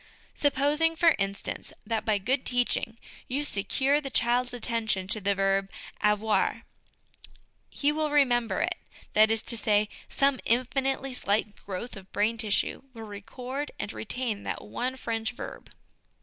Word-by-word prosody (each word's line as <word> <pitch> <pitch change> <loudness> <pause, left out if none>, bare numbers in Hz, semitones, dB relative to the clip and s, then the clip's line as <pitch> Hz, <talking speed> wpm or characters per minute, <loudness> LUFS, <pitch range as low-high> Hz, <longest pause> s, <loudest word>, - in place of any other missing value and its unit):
Supposing, 295 +3 +2
for 330 0 +5
instance, 195 0 -3
that 220 0 -1
by 215 -2 +3
good 250 +7 0
teaching 245 -2 0 0.3
you 275 +3 -1
secure 275 +4 +2
the 275 - -5
child's 245 0 +2
attention 225 -5 0
to 215 0 0
the 200 +1 +1
verb 195 0 +1 0.3
avoir, 210 +1 +2 1.1
he 290 +1 +1
will 305 0 0
remember 245 -6 +3
it; - - +1 0.4
that 215 0 +6
is 225 0 +2
to 235 - 0
say, 210 -1 +2 0.2
some 275 -2 +2
infinitely 265 +2 +1
slight 210 -2 0
growth 200 +5 -6
of 195 -1 -12
brain 220 +3 +1
tissue 210 -3 0
will 225 - -7
record 250 +7 -5
and 205 - -4
retain 225 -2 -2
that - - -4
one 255 +2 -3
French 225 -2 -2
verb. 240 - -8
230 Hz, 145 wpm, -28 LUFS, 210-265 Hz, 1.1 s, that